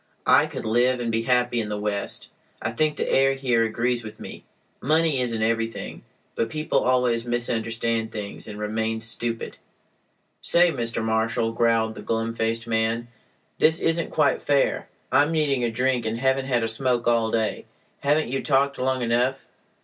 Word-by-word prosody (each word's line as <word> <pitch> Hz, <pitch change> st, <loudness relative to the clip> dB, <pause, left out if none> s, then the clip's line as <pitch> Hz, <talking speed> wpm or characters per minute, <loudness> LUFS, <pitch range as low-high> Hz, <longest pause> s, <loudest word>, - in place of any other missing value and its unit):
I -, -, +5 dB
could -, -, -7 dB
live 120 Hz, +3 st, +2 dB
and 120 Hz, -1 st, -2 dB
be 115 Hz, 0 st, 0 dB
happy 125 Hz, 0 st, +1 dB
in 105 Hz, -, -5 dB
the 105 Hz, -, -2 dB
West. 105 Hz, -1 st, -4 dB, 0.3 s
I 110 Hz, -, -3 dB
think 150 Hz, +5 st, 0 dB
the -, -, -1 dB
air 135 Hz, 0 st, +3 dB
here 125 Hz, -4 st, +1 dB
agrees 120 Hz, +2 st, -1 dB
with 110 Hz, -1 st, -10 dB
me. -, -, -9 dB, 0.4 s
Money 155 Hz, 0 st, +2 dB
isn't 115 Hz, -3 st, -1 dB
everything. 115 Hz, 0 st, -2 dB, 0.3 s
But 115 Hz, -, -1 dB
people 155 Hz, +3 st, 0 dB
always 125 Hz, -2 st, +1 dB
misunderstand 115 Hz, -1 st, -1 dB
things 105 Hz, -2 st, -6 dB
and 105 Hz, -1 st, -7 dB
remain 110 Hz, +1 st, -2 dB
stupid—" 115 Hz, +1 st, -2 dB, 0.8 s
"Say, 175 Hz, 0 st, +4 dB
Mr. 115 Hz, -4 st, -2 dB
Marshal," 115 Hz, +1 st, 0 dB
growled 115 Hz, -1 st, +1 dB
the -, -, -9 dB
glum 115 Hz, 0 st, -2 dB
faced 115 Hz, 0 st, -1 dB
man. 115 Hz, +1 st, -1 dB, 0.5 s
"This 160 Hz, +1 st, +4 dB
isn't 165 Hz, 0 st, 0 dB
quite 150 Hz, -3 st, +2 dB
fair. 140 Hz, -1 st, +1 dB, 0.2 s
I'm 145 Hz, +2 st, +4 dB
needing 145 Hz, -5 st, +1 dB
a 120 Hz, -, +1 dB
drink, 125 Hz, 0 st, 0 dB
and 110 Hz, +1 st, -2 dB
haven't 130 Hz, +1 st, +1 dB
had 120 Hz, -3 st, +1 dB
a -, -, +1 dB
smoke 120 Hz, +1 st, 0 dB
all 115 Hz, -1 st, +3 dB
day. 110 Hz, -1 st, -1 dB, 0.3 s
Haven't 145 Hz, 0 st, +1 dB
you 135 Hz, -, -1 dB
talked 140 Hz, -1 st, +1 dB
long 130 Hz, 0 st, 0 dB
enough? 125 Hz, +3 st, 0 dB
120 Hz, 170 wpm, -24 LUFS, 115-130 Hz, 0.8 s, I